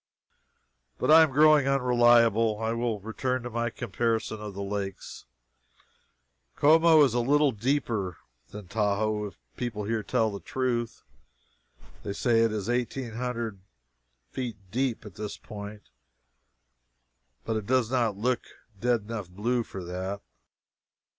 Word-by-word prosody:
But - - +1
I 160 +1 +9
am 160 - +5
growing 150 0 +5
unreliable. 120 -4 +4
I 110 0 -1
will 115 -2 -1
return 125 +4 -2
to 120 - -6
my 120 +1 -1
comparison 115 -1 -2
of 105 -2 -7
the 100 - -4
lakes. 100 -1 -5 1.3
Como 160 +1 +6
is 135 -5 +2
a 120 - +1
little 145 +3 +3
deeper 110 - -1 0.3
than 105 -2 -9
Tahoe, 105 +1 0
if 100 - -8 0.2
people 115 -4 -3
here 110 +1 -1
tell 110 0 0
the 100 - -6
truth. 120 -2 -2 1.0
They 100 - -4
say 115 +2 +2
it 115 -1 +3
is 105 -2 -3
eighteen 120 0 -2
hundred 115 -3 -4 0.7
feet 120 -5 -4
deep 125 -3 -1
at 105 - -10
this 105 -1 -6
point, 105 -1 -9 1.6
but 110 - -1
it 105 -2 -3
does 130 -2 +2
not 115 -6 +1
look 125 +4 0
a 105 -4 -23
dead 120 -2 +2
enough 105 -3 -6
blue 115 +7 -1
for 95 -4 -7
that. 95 +3 -4
115 Hz, 140 wpm, -27 LUFS, 105-125 Hz, 1.6 s, I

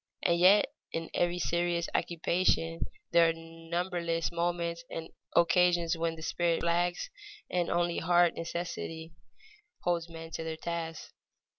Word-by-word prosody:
And 170 -1 +3
yet 200 +9 +6 0.2
in 165 0 -4
every 175 0 +1
serious 170 0 0
occupation 170 -1 +1 0.2
there 170 -1 +6
are - - +1
numberless 165 +1 -2
moments 170 0 -1
and 165 0 -6 0.3
occasions 170 0 +4
when 165 0 -1
the 160 - -9
spirit 170 0 +1
flags 175 - 0 0.4
and 175 -1 +1
only 175 0 +1
hard 175 0 +4
necessity 165 -1 -5 0.7
holds 170 -1 0
men 165 0 -9
to 165 - -4
their 160 0 -4
tasks. 165 -1 -5
170 Hz, 130 wpm, -31 LUFS, 165-175 Hz, 0.7 s, yet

